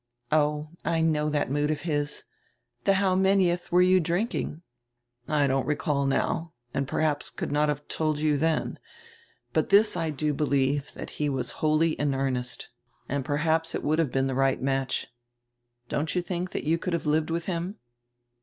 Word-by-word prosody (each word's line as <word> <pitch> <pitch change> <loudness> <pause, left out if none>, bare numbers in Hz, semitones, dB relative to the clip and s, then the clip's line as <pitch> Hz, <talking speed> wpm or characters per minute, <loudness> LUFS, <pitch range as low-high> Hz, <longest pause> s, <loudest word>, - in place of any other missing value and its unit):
"Oh, 150 0 +2
I 165 -1 +1
know 150 -2 +2
that 145 -3 0
mood 145 +1 +1
of 155 - -1
his. 145 -3 -2 0.6
The 195 - +4
how 190 -1 +2
manieth 185 -2 +2
were 180 +1 +6
you 185 +1 +5
drinking?" 175 -1 -2 0.6
"I 150 -2 +2
don't 135 -1 +1
recall 150 -2 0
now 165 +4 0 0.2
and 140 -1 -1
perhaps 150 +1 0
could - - -5
not 150 +1 +2
have 145 0 -3
told 155 -2 0
you 150 0 +2
then. 160 +2 0 0.7
But - - +1
this 210 +2 +5
I 165 -1 -1
do 150 0 -1
believe, 140 0 +1
that - - -7
he 150 - +2
was 135 -2 -2
wholly 155 +1 +3
in 145 -3 0
earnest. 130 -2 -2 0.4
And 140 0 -1
perhaps 160 +3 0
it - - -3
would 155 +2 +1
have 155 -6 +1
been 135 0 +1
the 135 - -1
right 135 0 +2
match. 135 0 -1 0.8
Don't 150 +6 -2
you 180 - +1
think 180 +1 -4
you 165 +2 +1
could 180 - -3
have 170 - -1
lived 155 +1 +1
with 170 +1 -2
him?" 180 +2 -3
150 Hz, 175 wpm, -27 LUFS, 145-165 Hz, 0.8 s, were